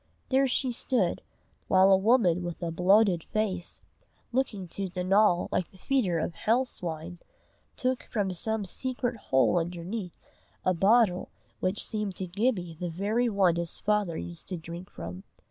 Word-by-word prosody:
There 270 Hz, +1 st, +3 dB
she 255 Hz, 0 st, +1 dB
stood, 245 Hz, +1 st, +1 dB, 0.5 s
while 190 Hz, +1 st, +5 dB
a -, -, +8 dB
woman 190 Hz, -4 st, +3 dB
with 175 Hz, 0 st, -5 dB
a 170 Hz, -, -1 dB
bloated 185 Hz, +1 st, +4 dB
face, 195 Hz, -5 st, -2 dB, 0.5 s
looking 235 Hz, -7 st, -1 dB
to 195 Hz, +3 st, -3 dB
Donal 180 Hz, +1 st, +3 dB
like 180 Hz, -, -1 dB
a 190 Hz, -, -16 dB
feeder 200 Hz, -5 st, +1 dB
of 165 Hz, +1 st, -2 dB
hell 235 Hz, +8 st, +1 dB
swine, 170 Hz, -5 st, -6 dB, 0.6 s
took 255 Hz, -1 st, -1 dB
from 200 Hz, -4 st, -1 dB
some 220 Hz, +3 st, -2 dB
secret 250 Hz, +4 st, -2 dB
hole 175 Hz, -4 st, +2 dB
underneath, 175 Hz, +3 st, -5 dB, 0.4 s
a 185 Hz, -, +3 dB
bottle 195 Hz, +1 st, +3 dB, 0.3 s
which 185 Hz, +3 st, 0 dB
seemed 210 Hz, -4 st, -3 dB
to 190 Hz, -, -3 dB
Gibbie 185 Hz, -3 st, -1 dB
the 180 Hz, -1 st, -2 dB
very 210 Hz, +8 st, 0 dB
one 190 Hz, -5 st, +3 dB
his 170 Hz, -1 st, -1 dB
father 210 Hz, -5 st, 0 dB
used 85 Hz, 0 st, -7 dB
to 185 Hz, -, -3 dB
drink 170 Hz, +2 st, -8 dB
from. 90 Hz, +3 st, -8 dB
190 Hz, 155 wpm, -28 LUFS, 175-220 Hz, 0.6 s, a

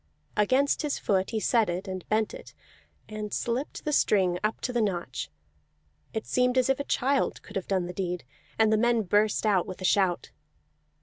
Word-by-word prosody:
Against 260 Hz, +7 st, +2 dB
his 300 Hz, -2 st, -1 dB
foot 190 Hz, -2 st, 0 dB
he 225 Hz, -, -1 dB
set 225 Hz, -1 st, +2 dB
it, 180 Hz, +3 st, -3 dB
and 185 Hz, -1 st, -6 dB
bent 215 Hz, 0 st, +1 dB
it, -, -, -11 dB, 0.5 s
and 215 Hz, -1 st, -6 dB
slipped 245 Hz, +5 st, -3 dB
the 300 Hz, -, 0 dB
string 185 Hz, -8 st, +3 dB
up 215 Hz, +1 st, 0 dB
to 250 Hz, -, -2 dB
the 240 Hz, -, +1 dB
notch; 175 Hz, -, -2 dB, 0.8 s
it 220 Hz, -, -4 dB
seemed 250 Hz, 0 st, +1 dB
as 255 Hz, +1 st, +4 dB
if 270 Hz, -, -1 dB
a -, -, -1 dB
child 275 Hz, +2 st, +1 dB
could 205 Hz, -, -13 dB
have 195 Hz, -, -3 dB
done 190 Hz, -3 st, 0 dB
the 180 Hz, -, -6 dB
deed, 180 Hz, -2 st, -3 dB, 0.3 s
and 220 Hz, -1 st, +4 dB
the -, -, +4 dB
men 235 Hz, 0 st, +2 dB
burst 210 Hz, +3 st, +2 dB
out 195 Hz, -4 st, +2 dB
with 185 Hz, -, -7 dB
a 185 Hz, -, -4 dB
shout. 185 Hz, -2 st, +2 dB
215 Hz, 195 wpm, -27 LUFS, 185-240 Hz, 0.8 s, as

